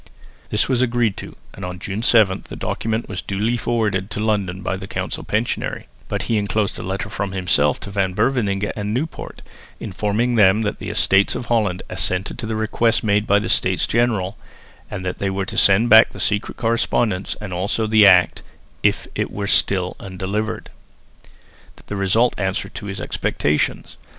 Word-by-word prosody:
This 105 - +1
was 130 -2 +1
agreed 120 -4 +1
to, - - -8 0.2
and 100 - -10
on 90 0 -5
June 100 +3 -4
7 110 -5 +3
the - - -6
document 110 +1 -2
was 95 -4 -4
duly 105 +5 -1
forwarded 110 -5 -1
to 105 - -5
London 100 -4 -1
by - - -1
the - - -7
council - - -4
pensionary; 110 +3 -2 0.2
but - - -2
he 115 - 0
enclosed 105 0 -1
a - - -5
letter 95 +2 -3
from 100 -2 -4
himself 85 -6 +1
to 100 - -7
Van 95 -2 -1
Beverningh 105 -4 +1
and 105 +1 -3
Nieuwpoort 155 +5 -6 0.4
informing 105 +4 -1
them 105 -1 +4
that 105 - -2
the - - -5
Estates 100 +1 +3
of - - -4
Holland 105 -7 0
assented 90 +4 -2
to 115 - -4
the 110 - -2
request 110 +1 +1
made 105 0 +1
by 100 - +5
the 105 - -1
States - - +2
General, 110 -5 0 0.5
and 95 - -6
that 90 - -3
they 100 - 0
were 95 0 -2
to 95 - -6
send 100 +4 +5
back 110 -1 +8
the - - -10
secret 105 0 -1
correspondence 115 -4 0
and 105 -4 -6
also 100 +5 -1
the 110 -1 +6
Act, 90 -2 +5 0.4
if - - +1
it - - -2
were 100 - -4
still 95 -2 +1
undelivered. 100 +4 -4 1.1
The 105 - -5
result 100 +5 +2
answered 95 -1 -2
to 105 - -7
his 100 -1 -5
expectations. 75 -3 -1
105 Hz, 180 wpm, -21 LUFS, 95-110 Hz, 1.1 s, back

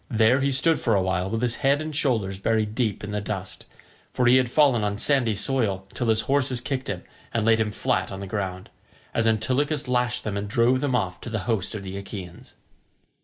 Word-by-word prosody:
There 115 +2 +3
he 140 +1 +1
stood 160 +5 +2
for 115 -4 +1
a 95 - +3
while 95 0 -1
with 115 +3 -2
his 120 -1 0
head 140 +1 +2
and 155 -1 -5
shoulders 110 -10 0
buried 110 0 0
deep 110 -4 -1
in 105 - -5
the 105 0 -2
dust—for 100 +4 -6
he 125 +2 +6
had 130 -2 +2
fallen 130 -5 +3
on 100 0 -1
sandy 120 -3 +2
soil 100 -4 0
till 120 - -2
his 110 0 +4
horses 135 -3 +1
kicked 130 +1 -3
him 95 -3 -4 0.3
and 115 -2 0
laid 115 0 +4
him 110 -1 +1
flat 105 - -1
on 95 - -6
the 100 - -5
ground, 95 -2 -4 0.4
as 115 0 +2
Antilochus 135 +7 +1
lashed 125 -1 0
them 105 -2 -3
and 100 0 -3
drove 120 +3 +2
them 140 -3 0
off 90 -7 -2
to - - -7
the 110 -3 -2
host 110 -3 -1
of 100 - -5
the 95 0 -6
Achaeans. 95 -3 -9
115 Hz, 220 wpm, -25 LUFS, 100-130 Hz, 0.4 s, he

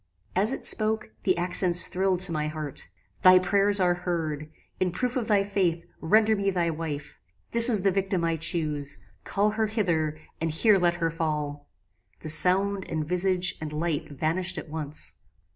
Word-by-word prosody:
"As 205 +6 +1
it 270 - -5
spoke, 215 - +1
the - - +2
accents 175 0 +4
thrilled 185 -1 0
to 185 -2 +3
my 150 -1 -2
heart. 150 -2 -6 0.3
"Thy 185 0 +7
prayers 200 +2 +2
are 180 -1 +3
heard. 160 -4 -4 0.3
In 185 - +1
proof 250 +8 -3
of 240 -4 -2
thy 205 -2 +3
faith, 185 -4 -1
render 215 +6 +3
me 200 -1 -1
thy 175 -3 0
wife. 155 -2 -6 0.3
This 235 +1 +7
is 210 -6 +3
the 195 - +3
victim 190 -2 -1
I 165 -1 0
chuse. 150 -4 -2 0.3
Call 205 +1 0
her 220 +1 -1
hither, 170 -8 -1 0.2
and 165 - 0
here 195 +6 +3
let 175 -1 +2
her 165 -1 -1
fall." 150 -3 -4 0.5
The 155 - -6
sound, 190 +5 +3
and 155 -2 -3
visage, 180 +1 0
and 155 -1 -5
light 155 0 -3
vanished 170 +6 -1
at 160 - -7
once. 150 -1 -4
175 Hz, 175 wpm, -26 LUFS, 155-195 Hz, 0.5 s, Thy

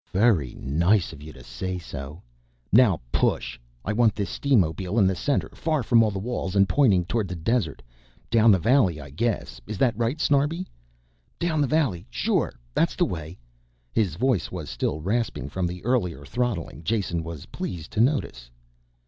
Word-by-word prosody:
"Very 95 - +3
nice 85 +7 +1
of 70 - -12
you 75 +1 -9
to 65 - -13
say 65 +11 -4
so. 75 -1 -8 0.5
Now 110 - +5
push. - - 0 0.3
I 105 - 0
want 110 -1 +3
this 100 -2 -3
steamobile 95 - +1
in 100 - +5
the 95 - +3
center, 140 +9 0
far 155 -4 -1
from 115 0 +5
all 110 - +3
the 100 - -4
walls, 100 -2 -3
and 100 0 +5
pointing 100 -11 +3
towards 105 0 -1
the 90 - -4
desert. 85 - -1 0.5
Down 115 0 +5
the 100 - +7
valley 100 - +3
I 70 -1 -10
guess, 115 - -2
is 105 -1 -5
that 120 0 +2
right, 120 +6 -1
Snarbi?" 150 +5 +1 0.7
"Down 165 -3 0
the 145 - +2
valley, 130 - 0
sure, - - 0 0.2
that's - - +1
the - - +2
way." 80 0 -6 0.6
His 95 -8 +1
voice 115 - 0
was - - -6
still 75 +5 -2
rasping 100 - -1
from 90 +4 -1
the 90 +3 -7
earlier 90 - 0
throttling, 105 - -3
Jason 95 -4 -1
was 85 -3 -7
pleased 80 -3 -6
to 110 - +1
notice. 115 - 0
100 Hz, 175 wpm, -25 LUFS, 80-120 Hz, 0.7 s, the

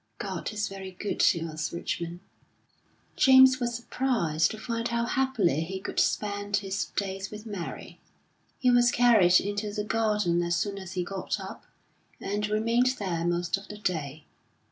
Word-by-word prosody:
"God - - -4
is 210 -1 -2
very 195 -1 -7
good 190 +3 -5
to 165 -2 +3
us, 155 -1 -4
Richmond." 170 0 -4 0.9
James 260 -1 +7
was 240 -1 -1
surprised 230 -11 0
to 220 - -6
find 230 +1 -3
how 235 0 -1
happily 235 - +1
he 190 +4 -4
could - - -3
spend 205 -1 0
his 195 -1 -2
days 195 -1 -3
with 210 +1 -9
Mary. 200 -6 -7 0.6
He 250 -2 +3
was 245 0 +5
carried 220 -8 +5
into 205 +1 -3
the 210 0 -3
garden 210 -5 +1
as 170 0 0
soon 200 +3 -2
as 190 -1 -8
he 180 -2 -1
got 190 +1 -4
up, - - -9 0.5
and 205 +1 -2
remained 230 +4 +2
there 175 -5 -2
most 175 +1 0
of 195 - -12
the 210 - -8
day. 155 -7 -3
205 Hz, 165 wpm, -27 LUFS, 175-230 Hz, 0.9 s, James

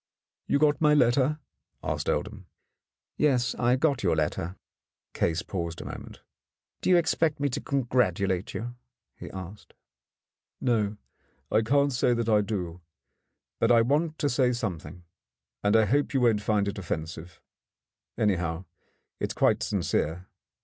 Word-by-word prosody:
"You - - +3
got 150 +1 +2
my 150 -1 +5
letter?" 130 +3 +3 0.5
asked - - -2
Oldham. - - -3 0.7
"Yes, 125 -5 +2
I 120 +1 +2
got 140 +1 +1
your 90 -4 +2
letter." 80 +3 -2 0.6
Case 85 0 0
paused 85 -3 -4
a - - -7
moment. - - -9 0.6
"Do - - 0
you 180 - +7
expect 160 -3 +1
me 145 0 +1
to 125 - -3
congratulate 100 -8 0
you?" 120 +2 -4 0.4
he - - -9
asked. 95 +2 -10 0.8
"No, 110 -4 0 0.5
I 110 - +4
can't 140 +4 +2
say 125 0 +2
that 115 -1 -1
I 105 -1 +5
do. 90 -5 -4 0.8
But 115 - +3
I 115 -1 +6
want 155 +5 0
to 145 - 0
say 125 -1 +2
something, 90 - -5 0.6
and 105 +1 +3
I 110 -1 +5
hope 140 +4 +1
you 135 - +3
won't 115 -4 +3
find 105 -1 +1
it 100 - -3
offensive. 80 -1 -5 0.8
Anyhow, 90 -5 0 0.5
it - - -1
is - - -23
quite - - +3
sincere. 85 +4 -1
115 Hz, 145 wpm, -27 LUFS, 95-135 Hz, 0.8 s, you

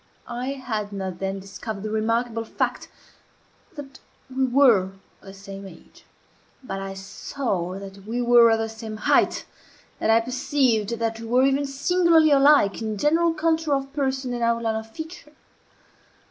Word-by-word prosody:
I 250 +3 -3
had 220 -6 -4
not 190 -3 -5
then 195 0 -3
discovered 195 +2 -7
the 215 - -4
remarkable 230 +1 0
fact 225 - -3 0.9
that 275 -3 -10 0.4
we 265 0 +2
were 245 -7 +5
of 190 - -11 0.3
the 195 - -11
same 195 0 -10
age; 175 - -17 0.6
but 195 -6 -5
I 195 0 -6
saw 195 -2 -4
that 195 0 -10
we 235 +2 -2
were 240 -1 +6
of 225 - +3
the 225 0 -2
same 220 -1 -8
height, - - +2 0.5
and 220 - +2
I 225 - +6
perceived 245 -2 0
that 225 0 -2
we 230 - -7
were 250 +3 +3
even 275 +1 +2
singularly 320 +3 +3
alike 275 -7 +5
in 215 -1 -3
general 325 +7 +2
contour 320 -2 +1
of 275 0 -4
person 265 -3 -1
and 240 - -4
outline 230 -1 +1
of 220 0 -5
feature. 315 +3 -9
235 Hz, 160 wpm, -24 LUFS, 210-275 Hz, 0.9 s, were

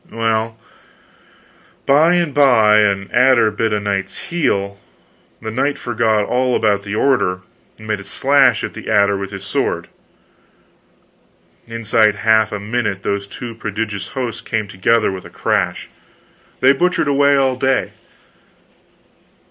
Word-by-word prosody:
Well, 115 0 -1 1.3
by 155 +5 +4
and 170 -5 0
by 115 -7 +5
an 100 -2 0
adder 125 -4 +4
bit 110 +1 -1
a 105 - 0
knight's 100 -1 -3
heel; 100 - -2 0.6
the 110 - -6
knight 140 +5 -1
forgot 110 -4 0
all 125 +2 0
about 105 -2 +1
the 100 +1 -5
order, 105 -8 +1 0.4
and 110 - -13
made 105 -2 -2
a - - -9
slash 135 +3 +2
at - - -4
the - - -8
adder 100 -2 +3
with 100 0 -5
his 95 -1 -8
sword. - - -2 1.8
Inside 115 -1 +2
of 105 - -4
half 110 +1 +2
a 105 - -4
minute 105 -2 -3
those 100 0 -2
two 115 +3 -8
prodigious 105 -2 -5
hosts 125 -4 -3
came 110 -2 -3
together 100 +3 +1
with 95 -1 -7
a - - -12
crash! - - -2 0.7
They 130 +2 +6
butchered 180 +2 0
away 140 0 +3
all 135 -1 +1
day. 130 0 0
110 Hz, 140 wpm, -18 LUFS, 100-130 Hz, 1.8 s, They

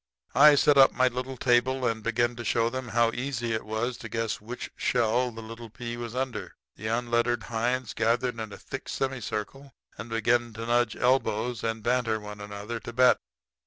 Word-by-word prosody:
"I 150 +2 +8
set 145 0 +5
up 135 - +8
my 130 0 +3
little 130 +1 -5
table 125 +1 +2
and 115 -2 0
began 120 +2 0
to 120 - -5
show 115 0 +1
them 130 0 -4
how 115 0 +2
easy 120 -2 -2
it 110 - -2
was 110 +3 -2
to - - -8
guess 115 -2 -2
which 120 +4 -7
shell 120 +1 +1
the 115 -1 -9
little 115 +1 -9
pea 120 +2 -6
was 120 0 -6
under. 130 -1 -3 0.2
The 110 - -6
unlettered 120 0 +1
hinds 120 +1 -1
gathered 115 +1 0
in 110 -2 -5
a 100 - -8
thick - - -7
semicircle 130 +1 -4 0.2
and 110 +3 -6
began 115 +1 +1
to 115 +1 -6
nudge 120 -1 +2
elbows 125 -2 +1
and 115 -1 -2
banter 120 -2 +1
one 105 0 -9
another 105 +3 -6
to 120 - -8
bet. 125 +1 +5
120 Hz, 190 wpm, -27 LUFS, 115-125 Hz, 0.2 s, I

